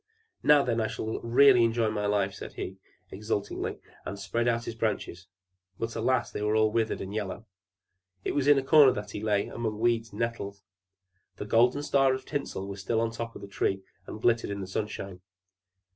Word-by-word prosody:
"Now, 145 -1 +6
then, 115 -2 0
I 110 - 0
shall 110 0 -4
really 125 +1 +6
enjoy 115 0 +2
life," 105 -2 0
said - - -8
he 95 - -6 0.3
exultingly, 105 0 -3 0.3
and 100 - -5
spread 115 +4 -1
out 115 -1 +1
his - - -4
branches; 105 -5 -3 0.5
but, 115 0 -4
alas, 120 +2 +1
they - - -5
were 105 +1 +1
all 110 0 +3
withered 110 0 0
and 95 +1 -6
yellow! 105 +1 -4 0.8
It - - -1
was 145 -1 0
in 145 -1 +7
a 135 - +1
corner 140 -1 +7
that 105 0 -6
he 105 - -5
lay, 105 -2 +1
among 110 -3 -4
weeds 115 0 +1
and - - -11
nettles. 100 -4 -3 0.7
The - - -5
golden 120 +6 +3
star 135 -2 +3
of 130 0 -8
tinsel 140 -9 -4
was 100 -1 -6
still 110 +4 0
on 115 0 0
the - - -11
top 115 0 -5
of - - -9
the - - -7
Tree, 95 -1 -1 0.2
and - - -7
glittered 115 -1 +2
in 100 0 -4
the - - -4
sunshine. 95 -1 -5
110 Hz, 200 wpm, -28 LUFS, 100-120 Hz, 0.8 s, in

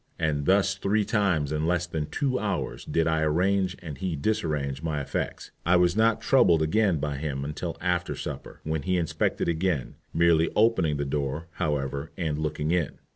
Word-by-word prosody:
And 75 -3 -1
thus 95 0 +4
three 100 +2 0
times 90 -10 +1
in 75 +1 0
less 90 0 +1
than 80 -4 -3
two 135 -3 -1
hours 100 -4 -3
did 80 - +1
I 80 -1 +1
arrange 90 +4 +1
and 75 -4 -7
he 95 -4 -2
disarrange 75 -6 -1
my 80 -2 -2
effects. 70 - -4
I 90 +2 +4
was 90 0 +4
not 110 +1 +3
troubled 85 -12 +4
again 95 +2 +2
by 75 -1 -2
him 70 -2 -3
till 85 +1 -4
after 90 0 -1
supper, - - -7
when 80 -1 -2
he 90 +5 0
inspected 85 -3 0
again, 85 -4 0 0.2
merely 85 -1 +3
opening 95 -9 +3
the 70 - -1
door, 75 +3 -2
however, 70 -1 -2
and 80 -5 -1
looking 75 0 -1
in. 85 -4 0
80 Hz, 180 wpm, -27 LUFS, 75-95 Hz, 0.2 s, thus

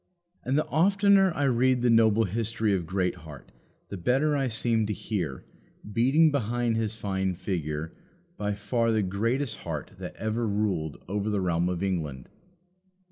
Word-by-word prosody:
And 130 +3 0
the 155 - +1
oftener 195 +5 +4
I 145 - 0
read 130 -1 +2
the 125 - +4
noble 115 -1 +4
history 110 +1 -1
of 90 -4 -1
Greatheart, 90 -5 -4 0.4
the 100 - -5
better 135 - +2
I 135 -2 +1
seem 115 -1 +1
to 105 - -1
hear, 85 - -4 0.5
beating 140 +8 +4
behind 120 -3 0
his 110 -1 -1
fine 95 -3 -2
figure, 80 -4 -3 0.4
by 105 - -2
far 115 +3 0
the 110 -2 +2
greatest 115 +7 -1
heart 75 -4 -6
that - - -7
ever 110 +1 -2
ruled 100 -7 -1
over 105 +2 -2
the 105 -1 0
realm 90 -1 +1
of 90 0 -2
England. 75 -9 -3
110 Hz, 155 wpm, -27 LUFS, 95-120 Hz, 0.5 s, oftener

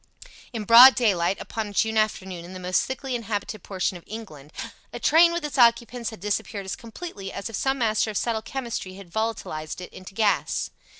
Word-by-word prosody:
In 225 -4 -4
broad 240 +5 +10
daylight, 195 -6 +2
upon 220 -2 -4
a 205 - -9
June 220 +2 +1
afternoon 190 -5 -1
in 175 +2 -10
the 185 - -7
most 185 0 +1
thickly 265 0 -4
inhabited 215 -3 -3
portion 185 -1 -2
of 170 - -15
England, 155 -10 -9 0.4
a - - -6
train 335 +2 +6
with 340 -2 -2
its 295 -2 -3
occupants 235 0 +3
had 220 - -10
disappeared 205 0 -3
as 190 - -3
completely 225 - -8
as 215 - -5
if - - -5
some 270 +5 0
master 220 -3 +1
of 210 - -2
subtle 230 -2 -1
chemistry 235 -7 -5
had 190 -3 -12
volatilized 220 -9 -3
it 180 - -9
into 185 +1 -11
gas. 205 -5 +1
215 Hz, 195 wpm, -25 LUFS, 190-235 Hz, 0.4 s, broad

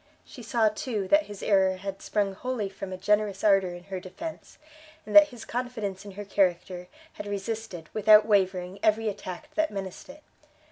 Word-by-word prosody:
She 250 - -12
saw, 225 -1 +2
too, 210 -2 -3
that 300 0 +4
his 205 -1 -9
error 190 -2 +3
had 195 +1 -6
sprung 205 -2 0
wholly 225 -1 -3
from 195 0 -8
a 185 - -5
generous 205 0 +1
ardor 195 -4 +3
in 175 - -11
her 190 0 -5
defence, 200 - -9 0.5
and 210 - -6
that 305 0 +10
his 245 -5 -11
confidence 225 -6 -4
in 200 - -9
her 205 +2 -7
character, 180 -2 0 0.3
had 205 - -8
resisted, 205 -4 -5
without 215 0 +6
wavering, 190 -2 +1
every 220 +1 +2
attack 200 +9 -8
that 315 0 +1
menaced 195 +4 -7
it. 295 +2 -12
205 Hz, 180 wpm, -27 LUFS, 190-225 Hz, 0.5 s, that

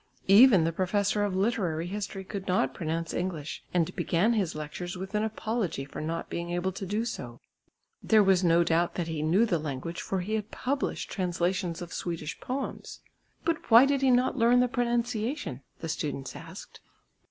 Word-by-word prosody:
Even 200 -2 +8
the 165 - +1
Professor 200 +4 0
of 200 -2 -1
Literary 190 -6 0
History 195 0 -5
could 195 0 -6
not 180 -8 +1
pronounce 165 +1 -3
English 170 -5 -4
and 170 -3 0
began 195 +8 +2
his 190 -8 0
lectures 175 +4 -5
with 190 +2 -7
an 210 - +1
apology 220 - -2
for 135 - -7
not 165 +2 -3
being 170 0 -4
able 175 +2 -1
to 195 +1 -6
do 210 +4 -1
so. 120 - -6 0.6
There 215 -1 +5
was 190 -1 +4
no 170 0 +5
doubt 170 +1 +1
that 175 -2 -2
he 160 -2 -3
knew 175 +9 +3
the 175 -7 0
language 150 +3 -4
for 190 -1 -2
he 205 +5 -4
had 215 -1 -2
published 275 +2 -2
translations 180 -1 -1
of 175 - -9
Swedish 170 -3 -4
poems. 265 +2 -5 0.4
"But 330 -1 -1
why 230 +3 +9
did 275 -1 +1
he 270 - +4
not 250 +1 +3
learn 245 0 +4
the 250 - +4
pronunciation?" 240 - -1 0.2
the 165 - -4
students 145 -4 -3
asked. 165 +5 -10
185 Hz, 180 wpm, -28 LUFS, 165-220 Hz, 0.6 s, why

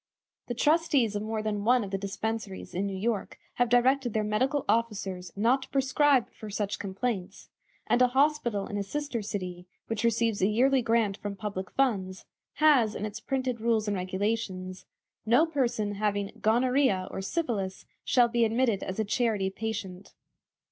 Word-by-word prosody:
The 240 - -3
trustees 295 -6 +2
of 205 - -1
more 215 0 -3
than 210 -1 -2
one 245 +2 +4
of 195 - -7
the 195 - 0
dispensaries 200 0 -4
in 195 +3 -1
New 195 -1 -4
York 215 +1 -2 0.2
have 245 -1 +2
directed 245 0 +3
their 215 - +1
medical 255 +7 0
officers 195 -6 -1
not 235 +6 +2
to - - -10
prescribe 270 -1 +3
for 215 - -9
such 205 0 -2
complaints, 195 -1 -4 0.4
and 245 - +2
a 250 - +7
hospital 260 -6 +1
in 205 - -5
a 200 - -1
sister 285 +2 -3
city, 185 -4 -5 0.2
which 225 -1 -3
receives 230 -2 +1
a 190 - +4
yearly 255 +5 +3
grant 225 -4 +1
from 205 -1 -5
public 195 -2 -5
funds, 195 -9 -1 0.3
has 275 -9 +4
in 210 - -3
its 215 +1 -6
printed 255 -2 -2
rules 225 -2 +1
and 205 - 0
regulations: 185 0 -3 0.4
"No 240 +9 +4
person 245 -9 -1
having 205 -1 -1
'Gonorrhoea' 240 -4 +2
or - - -4
'Syphilis' 200 - -2 0.2
shall 245 -2 +4
be 235 0 +1
admitted 230 -2 +1
as 190 - -5
a 220 - +1
charity 210 -3 0
patient." 200 -3 -6
220 Hz, 170 wpm, -28 LUFS, 200-245 Hz, 0.4 s, a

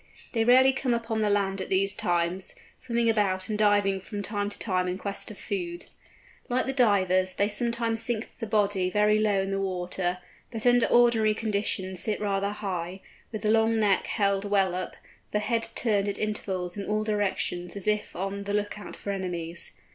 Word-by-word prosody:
They 225 -2 +2
rarely 260 +3 +6
come 260 -2 0
upon 230 -1 -2
the 210 - +2
land 195 -1 +1
at - - -5
these 195 +1 +2
times, 175 +1 -1 0.2
swimming 235 -1 0
about 195 -4 +1
and 215 - -1
diving 205 -2 +3
from 205 +1 -6
time 205 0 -1
to 205 - -9
time 185 -3 0
in 180 +1 -2
quest 200 0 -4
of 215 - -10
food. 175 -3 -5 0.6
Like 250 +1 +1
the 270 - -2
Divers, 185 -7 +3
they 200 - +2
sometimes 230 +1 0
sink 235 -2 -3
the 225 - -4
body 205 -3 +1
very 210 +2 +3
low 210 -2 +2
in 195 - -3
the 195 0 -1
water, 180 -1 -1 0.3
but 225 -1 -6
under 245 -1 +5
ordinary 230 -3 +4
conditions 200 -4 -1
sit 210 +3 0
rather 200 -1 0
high, 190 -3 -4 0.3
with 215 -3 -5
the 215 - +3
long 225 0 +3
neck 205 -3 +2
held 200 -2 +1
well 195 -3 +2
up, 185 +1 -4 0.4
the - - +3
head 230 +2 -1
turned 205 -4 +2
at 200 - -2
intervals 190 -4 -2
in 200 -1 -5
all 215 0 0
directions 200 -4 -1
as 200 - -4
if 210 0 0
on 195 +2 -4
the 205 0 -1
look 210 0 -2
out - - -9
for 200 - -5
enemies. 175 -3 -4
205 Hz, 195 wpm, -27 LUFS, 190-220 Hz, 0.6 s, rarely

